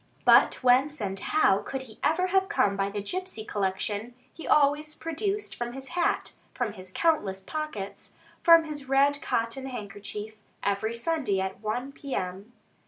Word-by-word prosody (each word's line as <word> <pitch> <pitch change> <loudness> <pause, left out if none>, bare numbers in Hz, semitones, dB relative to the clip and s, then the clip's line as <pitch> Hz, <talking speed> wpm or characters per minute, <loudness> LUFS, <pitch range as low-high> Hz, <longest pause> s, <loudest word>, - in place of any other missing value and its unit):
But - - +6
whence 265 +4 +4
and 195 -2 -3
how 200 -4 +3
could 265 +5 -5
he 225 -4 -15
ever 350 +4 +3
have 380 +1 +2
come 200 - +2
by 195 0 0
the 200 0 -4
gipsey 365 - -4
collection 205 +4 -2 0.2
he 325 - -9
always 300 +1 +3
produced 395 +6 -2
from 240 0 -4
his 270 +1 -7
hat, 345 -1 0 0.2
from 235 -5 -1
his 185 -2 -7
countless 205 - +1
pockets, 220 -6 -5 0.3
from 335 -1 +8
his 295 -4 -6
red 280 +1 +3
cotton 230 +4 -1
handkerchief, 210 -2 -6 0.3
every 200 +3 0
Sunday 260 - 0
at 190 0 -3
1 245 +5 -2
P.M.? 205 -7 -5
245 Hz, 155 wpm, -28 LUFS, 205-305 Hz, 0.3 s, from